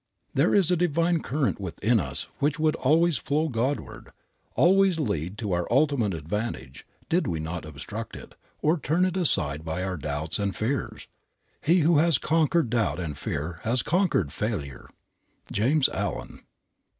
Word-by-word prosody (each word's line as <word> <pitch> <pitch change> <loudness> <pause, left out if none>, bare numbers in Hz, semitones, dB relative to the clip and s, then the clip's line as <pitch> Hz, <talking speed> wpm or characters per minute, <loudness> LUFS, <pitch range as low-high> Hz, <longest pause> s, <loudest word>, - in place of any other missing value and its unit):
There - - +3
is 185 -4 +4
a - - +4
divine 170 0 +1
current 135 -6 -1
within 110 +6 +1
us 65 -8 -4
which 145 +2 +1
would 155 -1 +2
always 160 +3 +3
flow 155 +3 0
Godward, 130 +3 -3 0.5
always 190 -1 +4
lead 100 - -2
to 105 -2 -3
our 90 -1 0
ultimate 130 - +2
advantage, 80 - -5 0.2
did 175 +3 +1
we 80 -3 -2
not 80 +1 -5
obstruct 80 +10 -7
it, - - -11 0.3
or 155 +3 +2
turn 165 +6 +1
it 185 -1 -1
aside 75 - +3
by 80 +3 -3
our 95 -1 -3
doubts 75 +4 -3
and 100 -1 -1
fears. 130 +6 -3 0.5
He 175 +3 +3
who 160 0 +4
has 165 -3 +4
conquered 160 -4 +1
doubt 115 -6 0
and 80 -5 -4
fear 80 +6 -4
has 115 +2 0
conquered 170 - +1
failure. 80 - -4 0.6
JAMES 130 +7 +3
ALLEN. 100 -4 -4
120 Hz, 155 wpm, -26 LUFS, -, 0.6 s, is